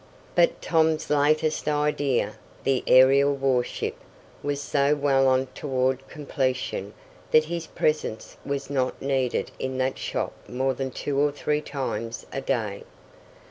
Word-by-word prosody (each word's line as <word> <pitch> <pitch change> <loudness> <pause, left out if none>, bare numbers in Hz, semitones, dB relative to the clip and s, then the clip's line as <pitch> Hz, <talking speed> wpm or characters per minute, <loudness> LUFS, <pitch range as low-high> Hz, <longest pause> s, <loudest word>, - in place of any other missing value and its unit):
But - - +3
Tom's 160 -2 +2
latest 155 +2 +2
idea, 150 -3 +1 0.3
the 135 -1 +1
aerial 135 +2 +6
warship, 135 -3 0 0.5
was 145 -1 -2
so 145 0 +2
well 135 -2 +3
on 130 0 +3
toward 130 -1 -1
completion 130 -8 -2 0.3
that 155 - +5
his 170 0 -4
presence 150 -7 -1
was 140 -1 -3
not 130 -2 0
needed 135 -2 -1
in 130 0 -3
that 130 0 -1
shop - - -2 0.2
more 130 +2 0
than 130 +1 -3
two 140 +2 -2
or 145 0 +3
three 150 +1 -1
times 120 -6 -4
a 135 - -2
day. 110 -8 -2
135 Hz, 135 wpm, -25 LUFS, 130-145 Hz, 0.5 s, aerial